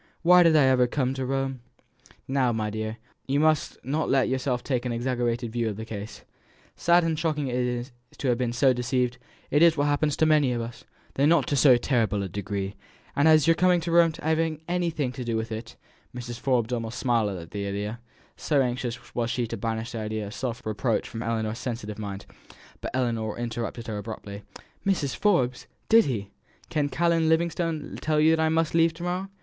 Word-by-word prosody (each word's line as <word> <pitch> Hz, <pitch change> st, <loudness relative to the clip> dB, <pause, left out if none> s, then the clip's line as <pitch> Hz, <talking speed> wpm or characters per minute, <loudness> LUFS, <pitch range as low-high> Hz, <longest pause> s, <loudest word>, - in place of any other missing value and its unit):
why 180 Hz, +1 st, +7 dB
did 165 Hz, -2 st, +5 dB
I 150 Hz, -, +6 dB
ever 130 Hz, -2 st, +4 dB
come 130 Hz, 0 st, 0 dB
to 130 Hz, -1 st, -3 dB
Rome?" 135 Hz, -1 st, -2 dB, 0.7 s
"Now, 130 Hz, -2 st, +2 dB
my 110 Hz, -2 st, -2 dB
dear, 110 Hz, +1 st, -4 dB, 0.3 s
you 140 Hz, +2 st, +1 dB
must 155 Hz, -1 st, +2 dB
not 150 Hz, +4 st, -1 dB
let 135 Hz, -2 st, +3 dB
yourself 130 Hz, -1 st, -1 dB
take 125 Hz, -4 st, -1 dB
an 125 Hz, -, -2 dB
exaggerated 120 Hz, -1 st, -1 dB
view 120 Hz, -2 st, 0 dB
of 105 Hz, -, -4 dB
the 110 Hz, -, -6 dB
case. 105 Hz, -1 st, -7 dB, 0.5 s
Sad 175 Hz, +1 st, +4 dB
and 160 Hz, -2 st, 0 dB
shocking 150 Hz, -5 st, -1 dB
as -, -, -2 dB
it 125 Hz, -, +1 dB
is 125 Hz, +1 st, -3 dB, 0.3 s
to 135 Hz, -, -1 dB
have 120 Hz, -, +2 dB
been 125 Hz, -2 st, 0 dB
so 130 Hz, +2 st, +3 dB
deceived, 125 Hz, 0 st, -1 dB, 0.3 s
it 145 Hz, -, +3 dB
is 165 Hz, -2 st, +6 dB
what 145 Hz, -, +2 dB
happens 145 Hz, 0 st, +1 dB
to 160 Hz, -, +3 dB
many 150 Hz, -5 st, +3 dB
of 120 Hz, -, -2 dB
us, 115 Hz, 0 st, -7 dB, 0.3 s
though 140 Hz, +2 st, +2 dB
not 160 Hz, -3 st, +4 dB
to 145 Hz, -, +1 dB
so 130 Hz, -2 st, +6 dB
terrible 110 Hz, -6 st, 0 dB
a -, -, -3 dB
degree; 100 Hz, +1 st, -4 dB, 0.4 s
and 145 Hz, +2 st, +4 dB
as 155 Hz, -1 st, +6 dB
to -, -, +2 dB
your -, -, +3 dB
coming 180 Hz, +1 st, +4 dB
to 170 Hz, +1 st, -3 dB
Rome 170 Hz, -1 st, +5 dB
having 160 Hz, 0 st, 0 dB
anything 170 Hz, -6 st, -1 dB
to 125 Hz, 0 st, -6 dB
do 115 Hz, -1 st, -1 dB
with 110 Hz, +1 st, -4 dB
it 110 Hz, +1 st, -6 dB, 0.2 s
" -, -, -26 dB
(Mrs. 120 Hz, -1 st, -6 dB
Forbes 125 Hz, -3 st, +1 dB
almost 115 Hz, 0 st, -3 dB
smiled 115 Hz, -7 st, +1 dB
at 85 Hz, -1 st, -10 dB
the 100 Hz, -1 st, -3 dB
idea, 105 Hz, +3 st, -4 dB, 0.4 s
so 145 Hz, -3 st, +1 dB
anxious 125 Hz, -1 st, -2 dB
was 120 Hz, -1 st, -1 dB
she 120 Hz, 0 st, -1 dB
to 115 Hz, -, -5 dB
banish 115 Hz, +1 st, -3 dB
the 115 Hz, -, -4 dB
idea 110 Hz, 0 st, -3 dB
of 100 Hz, -, -8 dB
self 125 Hz, -1 st, -4 dB
reproach 110 Hz, +2 st, -1 dB
from 115 Hz, -, -6 dB
Ellinor's 115 Hz, -1 st, -2 dB
sensitive 110 Hz, -4 st, -5 dB
mind, 100 Hz, -2 st, -6 dB, 0.6 s
but -, -, -3 dB
Ellinor 115 Hz, -4 st, -1 dB
interrupted 120 Hz, 0 st, -4 dB
her 110 Hz, -3 st, -4 dB
abruptly:) 105 Hz, -2 st, -7 dB, 0.4 s
"Mrs. 175 Hz, -9 st, 0 dB
Forbes! 130 Hz, -12 st, +1 dB, 0.2 s
did 225 Hz, 0 st, +7 dB
he 105 Hz, -7 st, -3 dB, 0.4 s
did 145 Hz, -2 st, 0 dB
Canon 165 Hz, 0 st, +2 dB
Livingstone 165 Hz, -1 st, 0 dB
tell 155 Hz, -1 st, +1 dB
you 160 Hz, +1 st, +5 dB
that 160 Hz, -, -1 dB
I 160 Hz, -, +2 dB
must 160 Hz, 0 st, +1 dB
leave 165 Hz, 0 st, +3 dB
to 170 Hz, -, -8 dB
morrow? 180 Hz, +2 st, -2 dB
125 Hz, 210 wpm, -26 LUFS, 115-155 Hz, 0.7 s, why